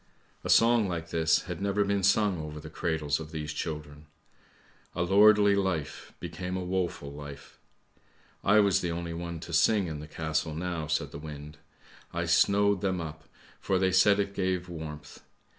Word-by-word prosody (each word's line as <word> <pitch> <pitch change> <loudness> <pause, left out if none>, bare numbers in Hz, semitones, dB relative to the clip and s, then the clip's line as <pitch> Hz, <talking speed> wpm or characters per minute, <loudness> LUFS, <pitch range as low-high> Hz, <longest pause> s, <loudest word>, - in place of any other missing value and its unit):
A - - -5
song 115 -2 +5
like 85 -2 -4
this 80 -1 +2
had - - -6
never 100 +1 +1
been 100 0 0
sung 100 -1 +3
over 75 -1 -6
the 75 +1 -10
cradles 80 -3 -1
of 80 -1 -8
these 75 -2 -5
children. 75 -1 -6 0.9
A 85 - 0
lordly 100 +2 +6
life 95 -7 -2
became 90 0 -5
a 90 - -3
woeful 90 -6 -2
life! 75 -1 -10 0.8
I 105 +1 +5
was 100 -3 +3
the 85 - -2
only 85 0 -4
one 85 0 -5
to 85 - -8
sing 100 +4 +3
in 80 -3 -5
the 75 - -8
castle 80 0 -2
now," 85 -2 -3
said 80 +1 -1
the - - -8
wind. 75 0 -9 0.3
" - - -24
I - - -1
snowed 100 -1 +3
them 95 -2 0
up, 80 -1 -7 0.3
for 95 - 0
they 95 0 +2
said 100 +2 +5
it 100 0 -1
gave 95 -2 -1
warmth. 80 -3 -8
85 Hz, 175 wpm, -29 LUFS, 80-95 Hz, 0.9 s, lordly